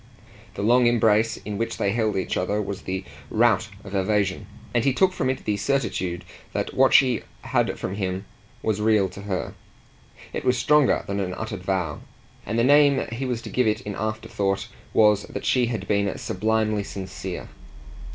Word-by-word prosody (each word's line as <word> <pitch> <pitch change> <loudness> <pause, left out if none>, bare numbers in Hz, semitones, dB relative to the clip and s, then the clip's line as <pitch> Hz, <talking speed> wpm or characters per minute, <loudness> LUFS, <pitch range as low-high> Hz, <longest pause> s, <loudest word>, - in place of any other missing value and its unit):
The - - -3
long 120 +3 +5
embrace 110 -1 +3
in 105 0 -6
which 115 0 -2
they 100 - +1
held 110 -1 0
each 95 - -1
other 100 +3 0
was 100 -2 -4
the 95 +1 -4 0.3
rout 110 -1 +3
of 100 - -10
evasion, 100 0 0 0.3
and 120 -1 +2
he 135 - +3
took 185 +6 +3
from 130 - -1
it 130 - -3
the 105 -1 0
certitude 100 -8 -1 0.3
that - - -2
what 135 0 +4
she 130 -3 +5 0.2
had - - 0
from 95 - -4
him 95 -1 -3 0.4
was 105 -1 0
real 105 -2 +3
to 100 - -10
her. 100 -3 -3 0.8
It - - -3
was 125 0 +2
stronger 145 +2 +3
than 100 0 -2
an 90 -2 -2
uttered 110 -1 -5
vow, 90 -5 -2 0.5
and 115 - -1
the 115 - +3
name 145 0 +5
he 120 +3 -3
was 120 -2 -2
to - - -7
give 125 -2 +2
it 105 - +1
in 105 - -5
afterthought 105 -2 -2 0.2
was 105 -1 +4
that - - -6
she 125 -2 +3
had 115 -2 -4
been 100 -1 +1
sublimely 110 +1 0
sincere. 95 -2 -6
105 Hz, 180 wpm, -24 LUFS, 100-120 Hz, 0.8 s, long